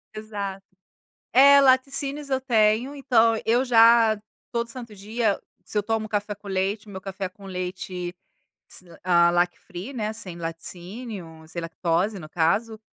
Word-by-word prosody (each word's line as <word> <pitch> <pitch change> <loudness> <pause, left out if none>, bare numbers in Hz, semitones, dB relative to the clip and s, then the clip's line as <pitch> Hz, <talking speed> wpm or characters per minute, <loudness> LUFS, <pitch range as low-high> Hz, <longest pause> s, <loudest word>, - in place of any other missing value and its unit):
Exato. 200 -3 -5 0.7
É, 280 +3 +8
laticínios, 275 +2 +2
eu 265 0 +1
tenho, 230 +1 +2
então 230 -5 +3
eu 240 +3 +3
já 230 -2 +6 0.3
todo 235 0 -2
santo 235 -3 -8
dia, 215 +1 0 0.3
se - - -8
eu 205 - +3
tomo 220 0 -1
café 205 0 -2
com 205 0 -13
leite, 195 +3 -1
o 205 - -11
meu 190 -1 -8
café 195 -1 -4
com 200 +1 -17
leite 180 -1 -5 0.6
s 185 - -5 0.2
hã, 170 -1 +5
lac 175 0 +2
free 190 +8 -8
né, 215 -3 -2
sem 190 -6 -6
laticínio, 170 +1 -7
sem 170 - -5
lactose, 175 +4 -1
no 155 - -9
caso, 215 +7 +1
210 Hz, 155 wpm, -25 LUFS, 185-235 Hz, 0.7 s, É